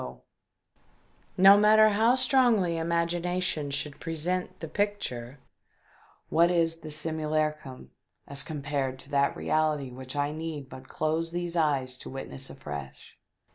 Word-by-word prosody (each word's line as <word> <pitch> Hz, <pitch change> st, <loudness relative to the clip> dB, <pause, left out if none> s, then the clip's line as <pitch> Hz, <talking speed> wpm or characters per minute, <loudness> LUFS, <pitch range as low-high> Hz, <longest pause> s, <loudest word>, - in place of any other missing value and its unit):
Why, 60 Hz, 0 st, -7 dB, 1.2 s
no 195 Hz, +2 st, +9 dB
matter 215 Hz, +1 st, +6 dB
how 220 Hz, +4 st, +3 dB
strongly 240 Hz, -10 st, +3 dB
imagination 170 Hz, -1 st, -1 dB
should 145 Hz, +1 st, -4 dB
present 180 Hz, +3 st, -2 dB
the 160 Hz, -, -5 dB
picture, 150 Hz, -, -3 dB, 0.9 s
what 170 Hz, +2 st, +4 dB
is 165 Hz, -2 st, +1 dB
the 160 Hz, -1 st, -9 dB
simu 155 Hz, 0 st, -4 dB
lacrum 150 Hz, -, -2 dB, 0.4 s
as 140 Hz, -1 st, -4 dB
compared 140 Hz, -3 st, -3 dB
to -, -, -12 dB
that 140 Hz, 0 st, +2 dB
reality 150 Hz, -4 st, 0 dB
which 130 Hz, +2 st, -8 dB
I 145 Hz, 0 st, 0 dB
need 155 Hz, -3 st, -6 dB
but 130 Hz, 0 st, -11 dB
close 160 Hz, +2 st, -1 dB
these 175 Hz, 0 st, -4 dB
eyes 135 Hz, -6 st, 0 dB
to -, -, -9 dB
witness 135 Hz, 0 st, -6 dB
afresh 75 Hz, -, -9 dB
155 Hz, 135 wpm, -28 LUFS, 140-175 Hz, 1.2 s, no